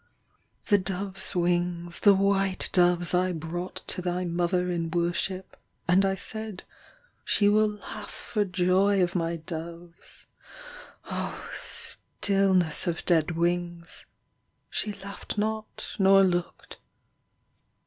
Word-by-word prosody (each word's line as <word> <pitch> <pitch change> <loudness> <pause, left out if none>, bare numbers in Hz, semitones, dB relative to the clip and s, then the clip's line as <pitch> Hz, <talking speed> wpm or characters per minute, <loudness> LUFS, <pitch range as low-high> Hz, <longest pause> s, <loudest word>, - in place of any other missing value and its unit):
\ - - -43
4 205 -2 +3
The - - -7
dove 190 +1 -3
s - - +6
wings, 175 0 +1
the 205 -2 +6
white 195 -1 +1
doves 175 -1 +4
I 180 +1 +1
brought 170 +3 -6
to 185 - -1
thy 180 0 -2
mother 175 +1 0
in 165 -1 -2
worship; 175 +2 -2 0.3
94 175 - +3
And 195 +2 +4
I 195 0 +1
said, 220 0 -3 0.6
she 205 - +3
will 215 +1 +4
laugh 210 0 -8
for 210 -2 -2
joy 190 +1 +2
of 175 - -1
my 170 -1 -1
doves. 170 +1 -9 0.8
Oh, - - -5
stillness 190 -5 0
Of 170 -2 -3
dead 165 -1 +1
wings. 175 0 -2 0.6
She 210 - -1
laughed 200 +1 -8
not 215 +1 -3
nor 195 0 +6
looked. 175 -2 -2
180 Hz, 130 wpm, -27 LUFS, 175-195 Hz, 0.8 s, s